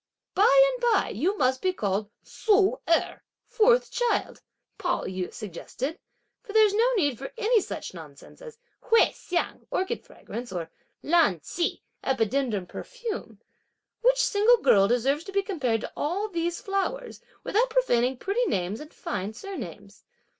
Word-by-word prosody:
"By 415 +4 +5 0.2
and - - -7
by 410 - +2
you 355 - -1
must 260 0 +1
be 370 0 +1
called 205 - -2 0.2
Ssu 415 +1 +2
Erh, 335 - +1 0.2
(fourth 480 +2 +3
child)," 485 -1 -1 0.4
Pao - - -1
yü 185 -1 -4
suggested, 245 - -6 0.4
"for 410 - -10
there's 430 -2 +5
no 465 +4 +3
need 290 - +1
for - - -6
any 455 0 +3
such - - -6
nonsense 155 - -13
as 475 -2 -11 0.2
Hui 460 -2 +4
Hsiang 350 -1 -3
(orchid 380 +5 -2
fragrance) 240 +1 -8
or 170 -3 -5 0.3
Lan 310 - +3
Ch'i 340 - -2 0.2
(epidendrum 230 -5 0
perfume.) 475 - -6 0.6
Which - - +4
single 430 +4 +4
girl 195 - +4
deserves 265 +7 +1
to 390 - -7
be 395 0 +1
compared 260 - -1
to - - -6
all 370 +8 -1
these 340 -2 -2
flowers, 455 +4 -3 0.2
without 475 +5 +1
profaning 255 - +2
pretty 415 - 0
names 185 +3 -1
and 300 0 -10
fine 205 +2 -4
surnames!" 210 - -8
340 Hz, 145 wpm, -26 LUFS, -, 0.6 s, By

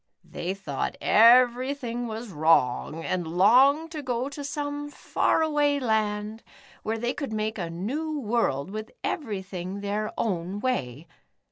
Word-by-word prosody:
They 180 +3 -4
thought 145 -9 -4
everything 245 +1 +4
was 225 +1 -6
wrong, 155 -1 +2
and 180 -3 -2
longed 260 - +4
to 310 -2 -5
go 255 0 -2
to 285 0 -7
some 290 0 -4
far 320 - +1
away 295 -2 +2
land, 215 -2 -1 0.4
where 225 +1 -2
they 240 +2 -1
could 280 -5 -5
make 215 0 -2
a 170 -2 -3
new 285 - -3
world, 210 - 0
with 215 +1 -5
everything 195 - -4
their 205 +1 -2
own 185 -1 -2
way. 160 - -2
220 Hz, 135 wpm, -26 LUFS, 190-270 Hz, 0.4 s, everything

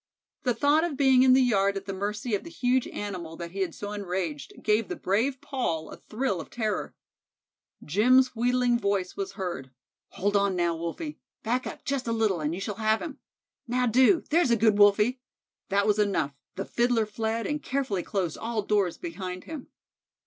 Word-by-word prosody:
The 245 -3 0
thought 295 +2 +3
of 330 -5 -2
being 265 -2 +5
in 260 0 +6
the 260 0 +6
yard 200 -4 +2
at 195 - -6
the 195 - -4
mercy 210 +4 -3
of 205 - 0
the - - -9
huge 255 -4 +1
animal 180 -6 -5
that 170 -1 -6
he 195 - -7
had 185 -4 -1
so 205 0 -6
enraged, 180 -8 -4
gave 215 +1 +2
the - - -4
brave 235 +8 0
Paul 170 - -2
a - - -7
thrill 215 -6 -2
of - - -11
terror. 215 -5 -2 0.9
Jim's 250 - +4
wheedling 245 +1 +2
voice 200 -3 -1
was 195 -1 -4
heard 175 -9 -5 0.4
"Hold 205 +2 0
on 200 -1 +2
now, 170 -1 +1
Wolfie; 170 - -5 0.2
back 245 +3 0
up - - -8
just 275 -3 -2
a - - 0
little, 215 -6 +1
and 150 +2 -1
you - - -5
shall 200 0 -4
have 220 0 +3
him. 320 -4 -7 0.5
Now 250 +1 +1
do; 260 - +4
there's 330 -3 +4
a 235 - +5
good 215 -1 +3
Wolfie" 210 +5 +4 0.5
that 200 +1 +2
was 210 0 +2
enough; 180 -9 +1 0.2
the 195 - -4
Fiddler 235 -2 +1
fled 220 +2 -2
and 295 0 -2
carefully 260 -9 -1
closed 180 -4 -2
all 225 -2 -2
doors 200 -4 +1
behind 185 - -6
him. 310 -5 -8
210 Hz, 190 wpm, -27 LUFS, 195-250 Hz, 0.9 s, in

